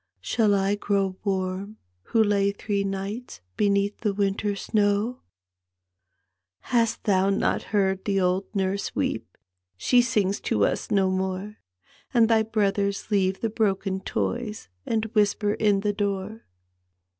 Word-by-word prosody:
Shall 215 -4 +2
I 195 +1 +1
grow 200 -2 0
warm 195 +1 -2 0.3
who 225 - +3
lay 200 -1 +2
three 200 0 -2
nights 195 - -5 0.2
Beneath 200 0 +1
the 210 -3 -1
winter 200 +1 0
snowf 210 +4 0 0.7
" 90 0 -54
Hast 230 -2 +2
thou 195 -1 +3
not 200 - +1
heard 190 -2 +1
the 195 -1 +1
old 185 +1 +1
nurse 195 0 -1
weep? - - -2 0.4
She 245 - +4
sings 210 -5 0
to 100 -1 +2
us - - -2
no 195 -2 +2
more; 190 +2 -3 0.6
And 230 -2 +6
thy 225 -1 +4
brothers 200 -2 -1
leave 190 -2 +1
the 225 - 0
bioken 195 -3 0
toys 230 -3 -3 0.2
And 225 -1 0
whisper 210 -1 +2
in 205 -2 +2
the 205 0 0
door." 200 +1 -3
200 Hz, 135 wpm, -25 LUFS, 190-210 Hz, 0.7 s, And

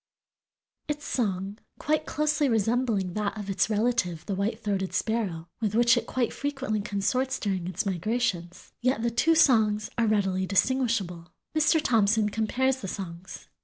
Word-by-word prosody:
Its 295 -1 -4
song, 200 -3 -2 0.2
quite 310 +1 -1
closely 300 -1 +1
resembling 225 -4 +1
that 210 +1 -2
of 205 -1 -4
its 195 - +1
relative 210 -7 0
the 200 - -3
white 200 +4 -1
throated 195 -3 -2
sparrow, 195 -8 -1
with 215 -2 -1
which 240 +1 +5
it 240 - -2
quite 250 -3 -1
frequently 270 -7 -2
consorts 250 +6 -1
during 190 -4 -2
its 185 - -3
migrations, 185 -2 -2
yet 250 -2 +1
the 235 - +1
two 320 +8 +3
songs 220 -8 +3
are 230 - +3
readily 190 -3 +1
distinguishable. 195 -6 0 0.2
Mr. 310 +1 +4
Thompson 220 -5 +2
compares 250 +5 0
the 235 - -6
songs. 185 -1 -7
215 Hz, 150 wpm, -27 LUFS, 195-250 Hz, 0.2 s, which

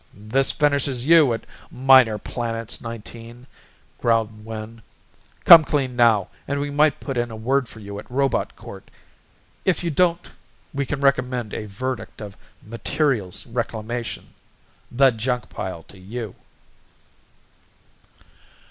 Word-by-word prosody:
"This 110 +7 +1
finishes 140 -4 0
you 160 -4 +6
at 115 -1 -3 0.2
Minor 130 -4 +5
Planets, 115 +1 -4
Nineteen," 115 +1 -9 0.5
growled 110 -2 0
Wynn. 110 +1 -8 0.6
"Come 165 -2 +11
clean 135 -4 -1
now 115 -5 +3 0.2
and 140 0 -1
we 145 0 -3
might 150 0 +3
put 135 -3 -5
in 120 0 -1
a 115 - -8
word 125 +3 0
for 110 - -12
you 100 0 -7
at - - -12
Robot 135 +2 0
Court. - - -12 0.7
If 185 -2 0
you 170 - -1
don't 170 +2 +1 0.4
we 140 -1 -2
can 145 +1 -3
recommend 125 -4 0
a 105 - -5
verdict 130 +5 -5
of 105 -2 -8 0.3
Materials 115 - -1
Reclamation 115 0 -4 0.6
the 135 +2 +5
junk 125 +2 -3
pile 90 -3 -6
to 95 - -16
you." 110 +2 -6
120 Hz, 130 wpm, -22 LUFS, 110-135 Hz, 0.7 s, Come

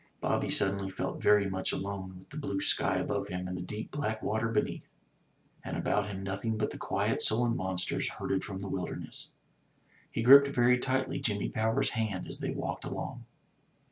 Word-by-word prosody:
Bobby - - 0
suddenly 100 0 +2
felt 95 - -4
very 105 -1 +5
much 95 -1 -1
alone, 95 -1 -4
with 95 - -17
the 145 - -8
blue 100 -10 -2
sky 100 - +1
above 100 -1 -1
him, 90 -1 -4
and 90 - -4
the 90 - -4
deep 105 +5 -6
black 110 -7 -2
water 110 +1 0
beneath, 110 -2 -1 0.8
and - - -4
about 105 0 +1
him 95 -1 -5
nothing 100 +3 -2
but 105 - 0
the - - -7
quiet - - 0
sullen 115 +1 +2
monsters 95 -3 -1
herded 95 - -2
from 95 - -5
the 100 +1 -5
wilderness. 90 -2 -5 0.8
He 115 - -2
gripped 140 +3 +10
very 125 -2 +4
tightly 130 +1 0
Jimmy 105 -3 -1
Power's 110 +1 +1
hand 110 -5 -2
as - - -2
they - - -2
walked - - -3
along. - - -5
105 Hz, 180 wpm, -31 LUFS, 95-115 Hz, 0.8 s, gripped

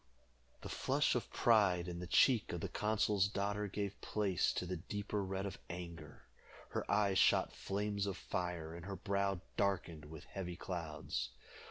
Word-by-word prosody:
The - - -6
flush - - +2
of - - -2
pride 100 -7 +4
in 85 -1 -4
the 90 - -5
cheek 120 +3 +5
of 85 - -3
the - - -1
consul's 105 -2 +2
daughter 100 +1 -1
gave 100 0 -3
place 100 -5 +1
to - - -2
the 90 0 -2
deeper 105 +3 -3
red 95 +1 -2
of 100 - -5
anger. 85 -3 -7 0.5
Her - - -3
eyes 100 -2 +3
shot - - +4
flames 100 0 -1
of 100 -2 -2
fire, 90 -3 -3
and 85 0 -8
her 100 - -3
brow 100 -1 0 0.2
darkened 90 -6 0
with 80 +1 -9
heavy 90 -3 -5
clouds. 85 -4 -3
95 Hz, 165 wpm, -37 LUFS, 90-100 Hz, 0.5 s, cheek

